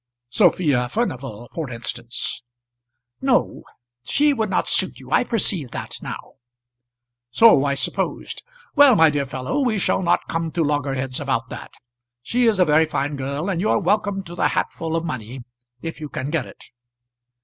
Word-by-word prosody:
"Sophia 145 - +3
Furnival, 130 - -3
for 160 -5 -4
instance." 120 0 -4 0.8
"No; 265 -2 +1 0.4
she 290 - +3
would 220 -5 -1
not - - 0
suit - - +2
you. - - -13
I - - +4
perceive 190 - 0
that - - -6
now." - - -8 0.9
"So 145 - +6
I 140 0 +1
supposed. - - -2 0.3
Well, 285 -4 +7
my 160 -5 +6
dear 140 -2 -1
fellow, 130 - -3
we 245 -6 +1
shall 190 - +1
not 175 -1 +1
come 165 0 -2
to 170 - +1
loggerheads 135 -3 -1
about 130 -4 -1
that. - - -9 0.5
She 245 - +1
is 220 -3 +3
a 180 - +4
very 155 +1 +4
fine 145 -1 -2
girl, 140 +5 -3
and 180 -4 -1
you 215 - +1
are - - +3
welcome 205 0 0
to 175 - -10
the 175 - +1
hatful 165 0 -2
of 165 0 -1
money 125 -2 -6 0.4
if 165 -1 -6
you 150 - -5
can 135 +2 -4
get 165 - -1
it." - - -14
155 Hz, 170 wpm, -22 LUFS, 130-195 Hz, 0.9 s, Well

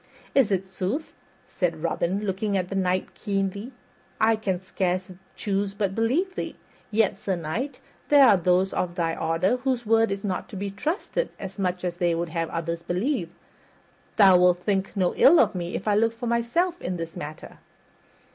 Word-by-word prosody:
"Is 260 -7 +4
it 190 -1 +1
sooth?" 190 - -4 0.3
said 165 -3 -2
Robin, 175 +3 0
looking 195 +1 -1
at 180 -1 -2
the 195 - -4
Knight 185 -1 0
keenly. 200 +3 -3 0.5
"I 225 0 +4
can 195 -4 -2
scarce 185 0 -2 0.2
choose 200 -1 -2
but 200 -2 -1
believe 265 - +1
thee; - - -5 0.3
yet, 210 -3 +2
Sir 195 -3 -1
Knight, 225 - -4 0.3
there 275 -7 +7
be 185 - -2
those 180 +2 +2
of 175 -1 -2
thy 165 -2 0
order 165 +8 +1
whose 250 -2 -1
word 225 +1 +4
is 195 0 -3
not 190 -3 -3
to - - -9
be 200 +1 -3
trusted 325 - -2
as 195 0 -7
much 180 -1 -1
as 175 -1 -3
they 175 -1 +1
would 170 0 -2
have 165 0 -2
others 170 0 -3
believe. 185 - -1 0.9
Thou 190 -4 +7
wilt 180 0 +3
think 195 -1 -1
no 185 -2 +2
ill 330 +5 +6 0.2
if 175 +3 -4
I 210 - +3
look 225 +2 +2
for 235 +2 -7
myself 240 +10 0
in 180 0 -3
this 165 -1 -6
matter." 150 +1 -8
195 Hz, 175 wpm, -25 LUFS, 180-225 Hz, 0.9 s, there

